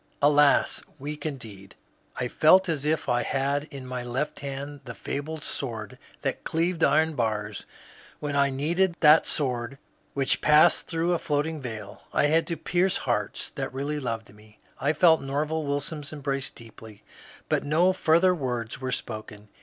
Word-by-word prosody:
" - - -39
Alas, 145 -1 +4 0.2
weak 150 +3 -5
indeed! 110 -9 -8 0.4
I 125 - -2
felt 185 +9 +5
as 150 -4 -1
if 155 +1 0
I 120 0 +2
had 140 +2 0
in 140 -4 -9
my 125 -1 -4
left 130 +5 -3
hand 140 +1 -6
the 120 -2 -7
fabled 150 +2 -5
sword 115 -6 -4 0.2
that - - -2
cleaved 165 +1 0
iron 160 +1 +4
bars 105 -5 -2 0.5
when 145 -1 -3
I 140 0 +4
needed 170 +7 +1
that 155 0 +7
sword 125 -2 -1 0.4
which 135 -1 +1
passed 150 0 +5
through 170 +1 0
a 170 - 0
floating 150 +1 -1
veil. 115 -4 -7
I - - +3
had 160 +3 +2
to 170 - -2
pierce 175 +4 +1
hearts - - -2
that - - -5
really 145 +2 -2
loved 115 -5 -4
me. 105 0 -19 0.2
I 145 - +2
felt 160 0 +5
Nerval 150 +3 -2
Wilson's 145 +1 -3
embrace 140 -2 -3
deeply, 110 -2 -14 0.4
but - - +1
no 170 +6 +3
further 180 +1 +4
words 125 -6 -3
were 130 -1 -2
spoken. 110 -3 -6
145 Hz, 160 wpm, -26 LUFS, 125-155 Hz, 0.5 s, that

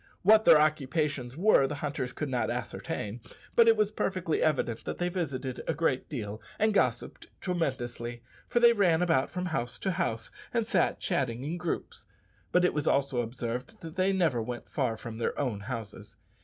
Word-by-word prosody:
What 215 +3 +6
their 155 - +8
occupations 145 -3 0
were 180 -7 +5
the 150 - -4
hunters 145 -4 -3
could 150 - -4
not 125 -4 -1
ascertain, 105 +3 -4 0.3
but 235 -1 +6
it 225 -1 +6
was 215 -1 +2
perfectly 185 -6 -1
evident 130 -7 0
that - - -4
they 175 0 0
visited 140 -8 -3
a 165 - 0
great 145 -5 0
deal 110 -6 -5 0.2
and 220 0 +2
gossiped 125 - 0
tremendously, 120 -9 -3 0.2
for 240 - +2
they 235 0 +7
ran 180 -6 +3
about 165 -6 +2
from 180 0 -3
house 125 -9 -2
to 190 - -1
house, 115 -9 -2 0.2
and 230 -2 +2
sat - - +1
chatting 130 -9 -1
in 155 +5 -3
groups; 175 -2 -4 0.4
but 180 0 +4
it - - +2
was 150 -1 -2
also 140 -3 +2
observed 125 - -5
that 165 0 -8
they 190 +1 +2
never 165 -11 +2
went 120 +1 -6
far 125 -6 0
from 115 0 -7
their - - -1
own 125 -8 -1
houses. 110 -1 -7
145 Hz, 185 wpm, -29 LUFS, 120-180 Hz, 0.4 s, their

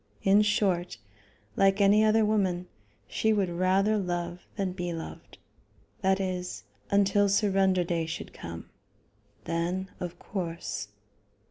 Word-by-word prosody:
In 200 +2 +5
short, 190 - +1 0.6
like 195 +1 +3
any 205 +2 +5
other 220 0 +4
woman, 190 -4 +1 0.4
she 220 - +1
would 200 -4 +1
rather 190 +4 +2
love 175 -1 -3
than 195 -3 -1
be 175 -1 -4
loved, 165 -1 -8 0.6
that 190 0 +2
is, 180 -2 -3 0.3
until 200 0 +3
surrender 195 -2 +3
day 170 -2 -1
should 160 - -6
come; 85 0 -8 0.8
then 175 +3 -2
of 175 -1 -5
course.... 170 - -4
190 Hz, 120 wpm, -28 LUFS, 175-200 Hz, 0.8 s, In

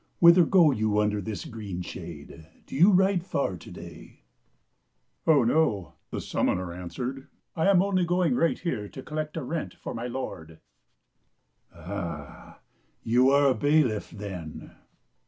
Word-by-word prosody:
Whither 170 0 +7
go 175 -6 +5
you 110 -4 0
under 105 -1 +1
this 100 -1 -5
green 100 -5 -6
shade? 80 -2 -9 0.2
Do - - -9
you 175 +8 +6
ride 190 -2 +3
far 140 - -1
to - - -13
day - - -12 0.3
?" - - -47
" - - -39
Oh, 150 -5 +6
no," 115 - +1 0.2
the - - -4
summoner 90 -1 -1
answered; 125 +10 -6
" - - -53
I 160 +3 +1
am 190 -2 +5
only 190 -2 +1
going 175 -4 +1
right 165 +6 +2
here 105 - -3
to 130 - -9
collect 155 +1 -4
a 160 - -3
rent 160 +5 -4
for - - -7
my 115 +1 -4
lord." 80 -11 -6 1.1
"Ah, 85 -4 -7 0.4
you 125 +3 +4
are 140 0 +5
a - - +3
bailiff, 145 -7 +1
then?" 95 -7 -8
125 Hz, 155 wpm, -27 LUFS, 100-160 Hz, 1.1 s, Whither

